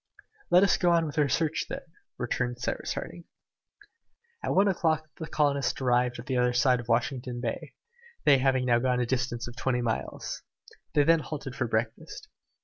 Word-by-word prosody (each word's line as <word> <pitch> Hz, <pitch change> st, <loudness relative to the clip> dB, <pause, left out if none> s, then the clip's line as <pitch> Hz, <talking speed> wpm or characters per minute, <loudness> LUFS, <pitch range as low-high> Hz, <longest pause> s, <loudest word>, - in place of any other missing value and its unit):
"Let 180 Hz, +2 st, +6 dB
us 200 Hz, -, +4 dB
go 175 Hz, -, +2 dB
on 165 Hz, -1 st, +3 dB
with 155 Hz, 0 st, -3 dB
our 145 Hz, -2 st, +3 dB
search, 160 Hz, +3 st, 0 dB
then," -, -, -5 dB, 0.3 s
returned 120 Hz, 0 st, -2 dB
Cyrus -, -, -3 dB
Harding. 170 Hz, -, -7 dB, 1.2 s
At -, -, -1 dB
one 195 Hz, +2 st, +5 dB
o'clock 160 Hz, -4 st, +1 dB
the 160 Hz, -, -5 dB
colonists 140 Hz, -5 st, +1 dB
arrived 125 Hz, -1 st, +2 dB
at 120 Hz, -, -8 dB
the 130 Hz, -1 st, -1 dB
other 125 Hz, 0 st, +2 dB
side 125 Hz, 0 st, +3 dB
of 120 Hz, -, -8 dB
Washington 120 Hz, +1 st, -1 dB
Bay, 120 Hz, -2 st, -4 dB, 0.5 s
they 140 Hz, -2 st, +6 dB
having 130 Hz, -1 st, +2 dB
now 120 Hz, -1 st, +3 dB
gone 125 Hz, 0 st, +1 dB
a 125 Hz, -, +1 dB
distance 125 Hz, -1 st, -2 dB
of 120 Hz, -, -9 dB
twenty 125 Hz, -1 st, -1 dB
miles. 115 Hz, -2 st, -3 dB, 0.5 s
They 145 Hz, -, +5 dB
then 165 Hz, +2 st, +5 dB
halted 145 Hz, -4 st, -6 dB
for 125 Hz, -, -1 dB
breakfast. 110 Hz, 0 st, -3 dB
130 Hz, 180 wpm, -28 LUFS, 120-150 Hz, 1.2 s, Let